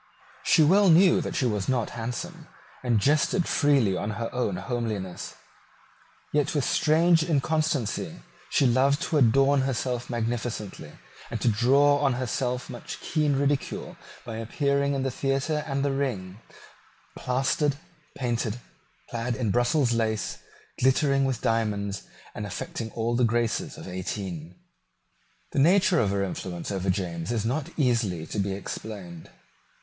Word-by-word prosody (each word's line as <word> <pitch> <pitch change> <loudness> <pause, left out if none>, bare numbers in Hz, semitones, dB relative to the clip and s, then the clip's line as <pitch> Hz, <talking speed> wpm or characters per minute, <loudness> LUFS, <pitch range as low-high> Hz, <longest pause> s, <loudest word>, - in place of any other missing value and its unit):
She 165 -5 +5
well 195 +5 +5
knew 180 +2 +6
that - - -4
she 130 - +1
was 105 -4 -1
not 125 -4 0
handsome, 155 +9 -5 0.4
and 120 -4 +2
jested 150 - +2
freely 135 -10 +3
on 105 - -2
her 115 0 -4
own 120 -6 0
homeliness. 105 -4 -4 1.0
Yet, 150 +1 +1
with 145 - +1
strange 165 +2 +4
inconsistency, 155 -5 0 0.3
she 140 - +3
loved 135 +4 +3
to 160 -4 +1
adorn 135 +3 +4
herself 125 -2 -2
magnificently, 115 -8 -3 0.4
and 115 - -3
drew 120 +4 +3
on 145 -1 +4
herself 125 0 -2
much 120 - -7
keen 150 -3 0
ridicule 140 0 -1 0.3
by 115 -2 -5
appearing 140 +4 0
in 135 - -1
the 135 - -1
theatre 135 +4 -1
and 140 -1 -1
the 140 - +1
ring 110 -9 -3 0.8
plastered, 135 +3 0 0.4
painted, 120 -2 -2 0.5
clad 120 +1 -2
in 115 -5 -1
Brussels 120 +2 +2
lace, 110 -2 -1 0.4
glittering 135 +1 +3
with 130 -3 -1
diamonds, 105 -3 0 0.3
and - - -5
affecting 115 - -5
all 115 +1 -1
the 125 - +2
graces 115 0 0
of - - -9
eighteen. 90 -2 -5 1.0
The - - 0
nature 175 +3 +4
of 105 - +2
her 100 0 0
influence 90 -1 -4
over 95 -1 -2
James 90 -1 -2
is 110 -3 -1
not 140 +7 -1
easily 115 - +1
to 105 - -4
be 100 0 0
explained. 95 -3 -7
125 Hz, 140 wpm, -26 LUFS, 110-140 Hz, 1.0 s, knew